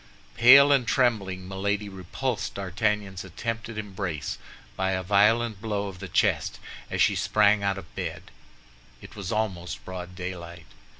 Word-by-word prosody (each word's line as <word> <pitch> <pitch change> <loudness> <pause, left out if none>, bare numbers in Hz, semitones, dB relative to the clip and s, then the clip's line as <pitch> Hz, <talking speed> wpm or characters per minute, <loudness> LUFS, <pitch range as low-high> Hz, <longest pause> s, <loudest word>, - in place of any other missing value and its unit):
Pale 140 - +8
and 135 -4 +3
trembling, 100 -8 +1
Milady 100 +2 -2
repulsed 100 +6 -4
D'Artagnan's 100 0 -1
attempted 115 -1 -5
embrace 95 -7 -4 0.4
by 95 0 0
a 95 0 -2
violent 105 +2 +3
blow 105 -2 -2
on 90 -2 -11
the 95 - -6
chest, - - +1 0.3
as - - +2
she - - +3
sprang 100 +1 +3
out 100 -1 0
of 90 -4 -10
bed. - - -5 0.7
It - - -13
was 100 -3 -5
almost 95 -5 -3
broad 90 -1 -7
daylight. 90 -2 -7
100 Hz, 140 wpm, -26 LUFS, 95-110 Hz, 0.7 s, Pale